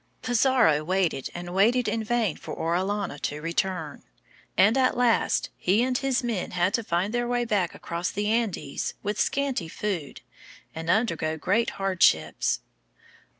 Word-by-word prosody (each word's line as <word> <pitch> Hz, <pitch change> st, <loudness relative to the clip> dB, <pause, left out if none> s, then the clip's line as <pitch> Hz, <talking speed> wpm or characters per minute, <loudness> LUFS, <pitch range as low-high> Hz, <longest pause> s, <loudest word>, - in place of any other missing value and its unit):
Pizarro 240 Hz, -, +3 dB
waited 175 Hz, -5 st, 0 dB
and 175 Hz, 0 st, -6 dB
waited 230 Hz, +6 st, +3 dB
in 220 Hz, +1 st, -1 dB
vain 225 Hz, -6 st, 0 dB
for -, -, -8 dB
Orellana 185 Hz, 0 st, -1 dB
to 145 Hz, +1 st, -3 dB
return, 165 Hz, -2 st, -2 dB, 0.6 s
and 205 Hz, +4 st, +5 dB
at 260 Hz, -2 st, +2 dB
last 245 Hz, -2 st, +2 dB
he 200 Hz, +6 st, +2 dB
and 255 Hz, 0 st, 0 dB
his 270 Hz, 0 st, 0 dB
men 230 Hz, -6 st, -2 dB
had 180 Hz, +3 st, +2 dB
to 230 Hz, -, 0 dB
find 185 Hz, +3 st, -1 dB
their 240 Hz, 0 st, 0 dB
way 245 Hz, 0 st, 0 dB
back 200 Hz, -6 st, 0 dB
across 170 Hz, +2 st, -3 dB
the 205 Hz, +1 st, -3 dB
Andes 225 Hz, -3 st, -1 dB
with 210 Hz, 0 st, -2 dB
scanty 270 Hz, -11 st, 0 dB
food 170 Hz, -4 st, -4 dB, 0.5 s
and 165 Hz, +1 st, -6 dB
undergo 170 Hz, -6 st, +1 dB
great 200 Hz, +9 st, +1 dB
hardships. 185 Hz, -, +2 dB
200 Hz, 150 wpm, -26 LUFS, 170-235 Hz, 0.6 s, and